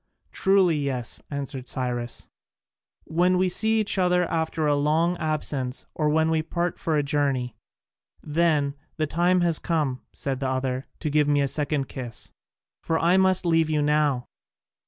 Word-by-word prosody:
"Truly 190 Hz, -4 st, +3 dB
yes," 130 Hz, -5 st, -3 dB
answered 140 Hz, -3 st, -5 dB
Cyrus, 125 Hz, -2 st, -3 dB, 0.8 s
"when 180 Hz, +3 st, +2 dB
we 185 Hz, +1 st, +2 dB
see 220 Hz, +4 st, +2 dB
each 205 Hz, -2 st, 0 dB
other 180 Hz, -1 st, +3 dB
after 160 Hz, -1 st, -1 dB
a 145 Hz, -1 st, +3 dB
long 155 Hz, +5 st, +2 dB
absence, 140 Hz, -5 st, -2 dB
or 150 Hz, -1 st, 0 dB
when 160 Hz, +1 st, +2 dB
we 160 Hz, -1 st, +2 dB
part 170 Hz, +2 st, -3 dB
for 160 Hz, -2 st, 0 dB
a 145 Hz, -, +2 dB
journey." 140 Hz, -4 st, -1 dB, 0.7 s
"Then 150 Hz, -2 st, +1 dB, 0.2 s
the 155 Hz, -, +1 dB
time 175 Hz, +4 st, +2 dB
has 170 Hz, -2 st, +2 dB
come," 150 Hz, -6 st, -1 dB
said 135 Hz, -2 st, -4 dB
the 135 Hz, -, -1 dB
other, 130 Hz, 0 st, -2 dB
"to 150 Hz, -, -2 dB
give 150 Hz, 0 st, +3 dB
me 145 Hz, -1 st, +3 dB
a 140 Hz, -, +1 dB
second 145 Hz, 0 st, 0 dB
kiss, 120 Hz, -4 st, -7 dB, 0.5 s
for 165 Hz, -, 0 dB
I 175 Hz, +3 st, +3 dB
must 190 Hz, -1 st, +3 dB
leave 165 Hz, -2 st, +2 dB
you 150 Hz, -1 st, +1 dB
now." 145 Hz, -4 st, +1 dB
150 Hz, 160 wpm, -25 LUFS, 140-170 Hz, 0.8 s, Truly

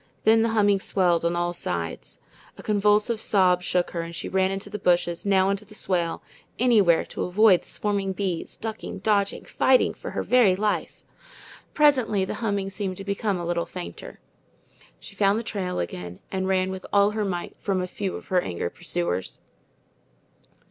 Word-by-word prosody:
Then 225 Hz, +1 st, +5 dB
the 230 Hz, -, +2 dB
humming 205 Hz, -3 st, +3 dB
swelled 180 Hz, -3 st, +1 dB
on 170 Hz, +1 st, +1 dB
all 175 Hz, 0 st, -1 dB
sides. 85 Hz, -, -5 dB, 0.4 s
A -, -, -11 dB
convulsive 210 Hz, +2 st, +2 dB
sob 185 Hz, -3 st, +3 dB
shook 180 Hz, 0 st, 0 dB
her, 170 Hz, -, -3 dB
and 165 Hz, 0 st, -7 dB
she -, -, -5 dB
ran 190 Hz, 0 st, +1 dB
into 195 Hz, +1 st, -4 dB
the 210 Hz, 0 st, -6 dB
bushes, 175 Hz, 0 st, +1 dB
now 195 Hz, -1 st, +3 dB
into 200 Hz, +1 st, -3 dB
the 210 Hz, 0 st, -15 dB
swale, 175 Hz, -4 st, -1 dB, 0.3 s
anywhere 210 Hz, -9 st, +4 dB
to -, -, -7 dB
avoid 190 Hz, 0 st, +4 dB
the -, -, -18 dB
swarming 200 Hz, -2 st, -1 dB
bees, 185 Hz, -3 st, -3 dB
ducking, 220 Hz, -1 st, -6 dB
dodging, 200 Hz, -2 st, 0 dB
fighting 260 Hz, -1 st, +3 dB
for -, -, -8 dB
her -, -, -3 dB
very 235 Hz, -7 st, +4 dB
life. 210 Hz, +2 st, -2 dB, 0.7 s
Presently 255 Hz, -10 st, +3 dB
the -, -, -4 dB
humming 200 Hz, -3 st, -1 dB
seemed 190 Hz, -2 st, -4 dB
to 195 Hz, -, -7 dB
become 200 Hz, 0 st, -1 dB
a 175 Hz, -, -4 dB
little 170 Hz, 0 st, -1 dB
fainter. 85 Hz, 0 st, -8 dB, 0.8 s
She -, -, -12 dB
found 200 Hz, 0 st, +2 dB
the 230 Hz, -, -3 dB
trail 190 Hz, -5 st, -3 dB
again, 90 Hz, 0 st, -5 dB
and 190 Hz, 0 st, -2 dB
ran 190 Hz, 0 st, +1 dB
with 190 Hz, -1 st, -6 dB
all 200 Hz, 0 st, +4 dB
her 215 Hz, 0 st, -2 dB
might 180 Hz, -3 st, -4 dB
from 195 Hz, -2 st, -1 dB
a 180 Hz, -, -1 dB
few 190 Hz, +1 st, -4 dB
of -, -, -10 dB
her 185 Hz, -1 st, +3 dB
angry 85 Hz, -, -4 dB
pursuers. 90 Hz, +2 st, -2 dB
195 Hz, 180 wpm, -25 LUFS, 175-210 Hz, 0.8 s, Then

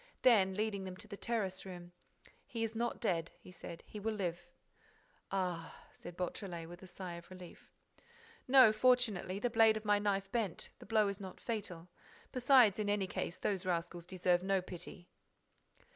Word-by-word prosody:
Then, 195 Hz, -6 st, +5 dB
leading 210 Hz, -1 st, -1 dB
them 185 Hz, -1 st, -6 dB
to 215 Hz, -, -10 dB
the 205 Hz, -, -7 dB
terrace 200 Hz, -4 st, -2 dB
room: 175 Hz, -2 st, -9 dB, 0.6 s
"He 230 Hz, -1 st, -3 dB
is 225 Hz, -1 st, -2 dB
not 235 Hz, +1 st, -1 dB
dead," 170 Hz, -7 st, -1 dB
he -, -, -14 dB
said. 170 Hz, -1 st, -9 dB
"He 210 Hz, -, -8 dB
will 220 Hz, +1 st, -2 dB
live." 175 Hz, -2 st, -3 dB, 0.8 s
"Ah!" 180 Hz, -4 st, -2 dB, 0.2 s
said 175 Hz, 0 st, -10 dB
Beautrelet, 180 Hz, -2 st, -4 dB
with 175 Hz, +1 st, -11 dB
a 190 Hz, -, -10 dB
sigh 180 Hz, 0 st, -6 dB
of 170 Hz, -, -12 dB
relief. 185 Hz, -2 st, -12 dB, 0.8 s
"No, 255 Hz, -4 st, +8 dB
fortunately, 215 Hz, -6 st, +2 dB
the 235 Hz, +4 st, -1 dB
blade 225 Hz, -1 st, +5 dB
of 215 Hz, -, -8 dB
my 205 Hz, 0 st, +4 dB
knife 195 Hz, -1 st, 0 dB
bent: 220 Hz, -7 st, -1 dB
the -, -, -12 dB
blow 215 Hz, -1 st, +3 dB
is 200 Hz, 0 st, -3 dB
not 190 Hz, -2 st, -8 dB
fatal. 195 Hz, -7 st, -4 dB, 0.4 s
Besides, 245 Hz, -5 st, +5 dB
in 205 Hz, -1 st, 0 dB
any 205 Hz, -1 st, +1 dB
case, 175 Hz, -1 st, -4 dB
those 195 Hz, -2 st, -1 dB
rascals 175 Hz, -1 st, -2 dB
deserve 180 Hz, -1 st, +2 dB
no 195 Hz, +1 st, +2 dB
pity." 180 Hz, 0 st, -8 dB
195 Hz, 175 wpm, -35 LUFS, 180-215 Hz, 0.8 s, No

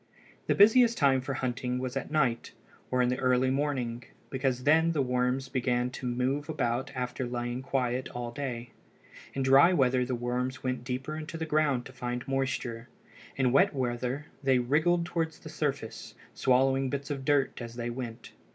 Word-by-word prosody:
The -, -, +3 dB
busiest 230 Hz, +3 st, +6 dB
time 135 Hz, -3 st, +4 dB
for 135 Hz, +1 st, -4 dB
hunting 125 Hz, -1 st, -2 dB
was 130 Hz, 0 st, -4 dB
at 135 Hz, -, -3 dB
night, 135 Hz, -7 st, 0 dB, 0.4 s
or 125 Hz, 0 st, +2 dB
in 125 Hz, -, +2 dB
the 125 Hz, -, -1 dB
early 130 Hz, 0 st, +2 dB
morning, 130 Hz, -4 st, -1 dB, 0.3 s
because 130 Hz, -1 st, -1 dB
then 160 Hz, +3 st, +4 dB
the 150 Hz, -, +1 dB
worms 125 Hz, +1 st, 0 dB
began 125 Hz, -1 st, 0 dB
to 125 Hz, 0 st, -5 dB
move 130 Hz, +5 st, -1 dB
about 130 Hz, -2 st, -1 dB
after 125 Hz, +1 st, -3 dB
lying 120 Hz, +1 st, -3 dB
quiet 130 Hz, -1 st, -1 dB
all 120 Hz, -1 st, -5 dB
day. 120 Hz, -3 st, -5 dB, 0.6 s
In 135 Hz, -, 0 dB
dry 135 Hz, +7 st, +6 dB
weather 130 Hz, -5 st, +3 dB
the 125 Hz, 0 st, -2 dB
worms 125 Hz, +2 st, -2 dB
went 130 Hz, -1 st, -2 dB
deeper 130 Hz, +4 st, -4 dB
into 155 Hz, +1 st, -6 dB
the 160 Hz, -, -3 dB
ground 150 Hz, -5 st, +1 dB
to -, -, -11 dB
find 125 Hz, +1 st, -4 dB
moisture. 130 Hz, -3 st, -2 dB, 0.5 s
In 130 Hz, -2 st, +2 dB
wet 140 Hz, +2 st, +4 dB
weather 125 Hz, +2 st, -2 dB, 0.2 s
they 135 Hz, -2 st, +3 dB
wriggled 160 Hz, +8 st, +2 dB
toward 165 Hz, -2 st, -2 dB
the -, -, -12 dB
surface, -, -, -4 dB, 0.2 s
swallowing 135 Hz, +1 st, +2 dB
bits 140 Hz, +2 st, -4 dB
of 135 Hz, -2 st, -3 dB
dirt 140 Hz, -2 st, +1 dB
as 120 Hz, 0 st, -7 dB
they 120 Hz, 0 st, -3 dB
went. 120 Hz, -1 st, -7 dB
130 Hz, 175 wpm, -29 LUFS, 125-140 Hz, 0.6 s, busiest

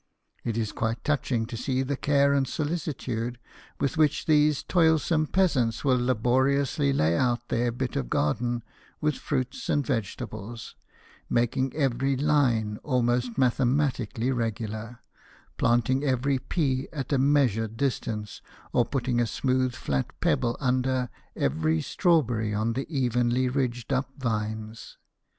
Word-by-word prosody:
It 115 Hz, -2 st, -2 dB
is 110 Hz, -3 st, -1 dB
quite 115 Hz, +1 st, -2 dB
touching 130 Hz, -6 st, 0 dB
to 120 Hz, +1 st, -7 dB
see 130 Hz, +2 st, -1 dB
the 140 Hz, +2 st, -2 dB
care 140 Hz, 0 st, +3 dB
and 135 Hz, -1 st, +2 dB
solicitude 130 Hz, -7 st, -3 dB, 0.4 s
with 140 Hz, +3 st, -1 dB
which 155 Hz, -2 st, +2 dB
these 150 Hz, -1 st, +3 dB
toilsome 160 Hz, -2 st, +2 dB
peasants 145 Hz, -, +1 dB
will 130 Hz, -3 st, +3 dB
laboriously 130 Hz, +4 st, +2 dB
lay 85 Hz, -10 st, +2 dB
out 120 Hz, +2 st, 0 dB
their 120 Hz, 0 st, +1 dB
bit 125 Hz, +1 st, -3 dB
of -, -, -2 dB
garden 120 Hz, +10 st, 0 dB, 0.4 s
with 150 Hz, 0 st, +1 dB
fruits 130 Hz, -2 st, -3 dB
or -, -, +3 dB
vegetables, 115 Hz, -4 st, -4 dB, 0.5 s
making 120 Hz, +2 st, +1 dB
every 135 Hz, -2 st, +1 dB
line 125 Hz, -8 st, +2 dB
almost 125 Hz, -2 st, 0 dB
mathematically 130 Hz, -2 st, +1 dB
regular, 115 Hz, -1 st, -3 dB, 0.6 s
plant 120 Hz, 0 st, +2 dB
ing 130 Hz, +2 st, +1 dB
every 135 Hz, 0 st, +1 dB
pea 135 Hz, -1 st, -1 dB
at 140 Hz, -2 st, -4 dB
a 135 Hz, -, +3 dB
measured 120 Hz, -6 st, +2 dB
distance, 110 Hz, -6 st, -2 dB, 0.3 s
or 120 Hz, -, +3 dB
putting 125 Hz, -1 st, -1 dB
a 120 Hz, -, +2 dB
smooth 130 Hz, 0 st, 0 dB
flat 70 Hz, -, -3 dB
pebble 120 Hz, 0 st, +1 dB
under 130 Hz, -1 st, 0 dB, 0.3 s
every 80 Hz, +3 st, +1 dB
strawberry 120 Hz, -, +1 dB
on 110 Hz, +2 st, 0 dB
the 135 Hz, +3 st, -3 dB
evenly 125 Hz, -2 st, +1 dB
ridged 125 Hz, -1 st, -1 dB
up 135 Hz, +1 st, 0 dB
vines. 110 Hz, -1 st, -4 dB
125 Hz, 130 wpm, -27 LUFS, 115-140 Hz, 0.6 s, care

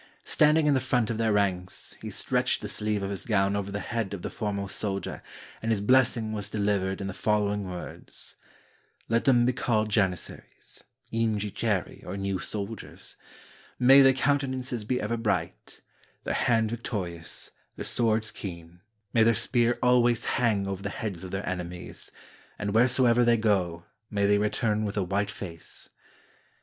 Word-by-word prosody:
Standing 150 Hz, +1 st, +4 dB
in 150 Hz, -, +4 dB
the 135 Hz, -, +3 dB
front 125 Hz, -3 st, +1 dB
of 110 Hz, -, -3 dB
their 110 Hz, -1 st, +2 dB
ranks, 95 Hz, -3 st, 0 dB
he -, -, -5 dB
stretched -, -, +1 dB
the -, -, -4 dB
sleeve 105 Hz, -1 st, -1 dB
of 100 Hz, -, -2 dB
his 100 Hz, -, -4 dB
gown 100 Hz, -3 st, +2 dB
over 100 Hz, -1 st, -2 dB
the 105 Hz, -, -3 dB
head 105 Hz, -1 st, -3 dB
of 90 Hz, -, -9 dB
the -, -, -4 dB
foremost 100 Hz, -2 st, -3 dB
soldier, 100 Hz, -3 st, -3 dB, 0.4 s
and 115 Hz, -, -2 dB
his 110 Hz, -3 st, +2 dB
blessing 115 Hz, 0 st, +3 dB
was 105 Hz, -1 st, -4 dB
delivered 100 Hz, -2 st, 0 dB
in -, -, -3 dB
the 95 Hz, -, -4 dB
following 105 Hz, -1 st, 0 dB
words 90 Hz, -1 st, -8 dB, 0.4 s
— -, -, -36 dB
'Let 115 Hz, +1 st, +2 dB
them 120 Hz, -3 st, +5 dB
be 125 Hz, -, +2 dB
called 110 Hz, -3 st, 0 dB
Janizaries 95 Hz, -5 st, -2 dB, 0.3 s
[yingi 110 Hz, -3 st, 0 dB
cheri, 105 Hz, -6 st, -1 dB
or 95 Hz, +2 st, -5 dB
new 100 Hz, -1 st, -2 dB
soldiers); 105 Hz, +3 st, -4 dB, 0.6 s
may 135 Hz, +2 st, +8 dB
their 135 Hz, -1 st, +7 dB
countenances 130 Hz, -3 st, 0 dB
be 125 Hz, +4 st, -1 dB
ever 115 Hz, +3 st, -1 dB
bright; 95 Hz, -6 st, -2 dB, 0.4 s
their -, -, -2 dB
hand 115 Hz, -2 st, +2 dB
victorious; 95 Hz, -8 st, -5 dB, 0.2 s
their -, -, -6 dB
swords 110 Hz, -2 st, +1 dB
keen; 85 Hz, -2 st, -8 dB, 0.3 s
may 115 Hz, -, +4 dB
their 115 Hz, +1 st, +5 dB
spear 120 Hz, +1 st, +2 dB
always 120 Hz, -2 st, +4 dB
hang 110 Hz, -5 st, +1 dB
over 95 Hz, -1 st, -4 dB
the 100 Hz, -, -3 dB
heads 100 Hz, -4 st, -5 dB
of 95 Hz, -, -6 dB
their 95 Hz, +2 st, -4 dB
enemies; 90 Hz, -1 st, -5 dB, 0.5 s
and, 105 Hz, -1 st, -2 dB
wheresoever 120 Hz, +1 st, +4 dB
they 120 Hz, 0 st, +4 dB
go, 90 Hz, -6 st, 0 dB, 0.2 s
may 100 Hz, -1 st, +1 dB
they 100 Hz, 0 st, +4 dB
return 105 Hz, 0 st, 0 dB
with 105 Hz, 0 st, -3 dB
a 100 Hz, -, +2 dB
white 100 Hz, +3 st, -1 dB
face.' 85 Hz, -4 st, -8 dB
105 Hz, 170 wpm, -27 LUFS, 100-115 Hz, 0.6 s, may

